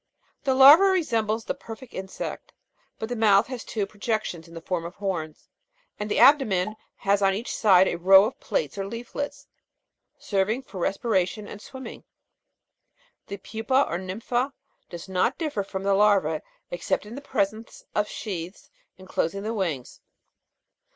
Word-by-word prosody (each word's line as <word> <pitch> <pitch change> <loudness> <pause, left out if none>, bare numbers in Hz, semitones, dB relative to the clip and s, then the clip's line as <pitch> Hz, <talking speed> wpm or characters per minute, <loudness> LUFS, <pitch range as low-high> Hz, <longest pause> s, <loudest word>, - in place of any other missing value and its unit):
The 265 -1 +2
larva 285 +8 +9
resembles 230 - +1
the - - -1
perfect 230 +2 -11
insect; 190 0 -6 0.4
but 220 - -4
the 245 - -3
mouth 210 -2 +4
has 255 -3 -6
two 210 -3 -2
projections 205 -5 -3
in 165 0 -9
form 175 0 -2
of 170 +2 -8
horns, 170 -6 -4 0.5
and 210 0 -3
the - - 0
abdomen 215 -7 +4 0.2
has 200 +1 +1
on 195 -1 +3
each 225 +5 -4
side 190 -3 +5
a 170 - -2
row 190 +3 +7
of 225 - -5
plates 485 - -2
or 195 - -2
leaflets, 280 +6 -6 0.7
serving 210 +6 -1
for 195 -7 -9
respiration 200 +1 0
and 205 - -9
swimming. 260 +3 -9 1.2
The 200 - -6
pupa 225 +7 0
or 170 - -3
nympha 235 +8 -2 0.4
does 170 0 -8
not 190 +7 0
differ 295 - -2
from 195 0 -6
the 200 0 +2
larva 195 -7 +3 0.3
except 175 +3 -2
in 210 - -9
the 275 - -7
presence 215 -3 -3
of 210 0 +1
sheaths 185 -3 -6 0.3
enclosing 185 0 -3
the 220 +2 -2
wings. 165 - -3
205 Hz, 150 wpm, -25 LUFS, 190-235 Hz, 1.2 s, larva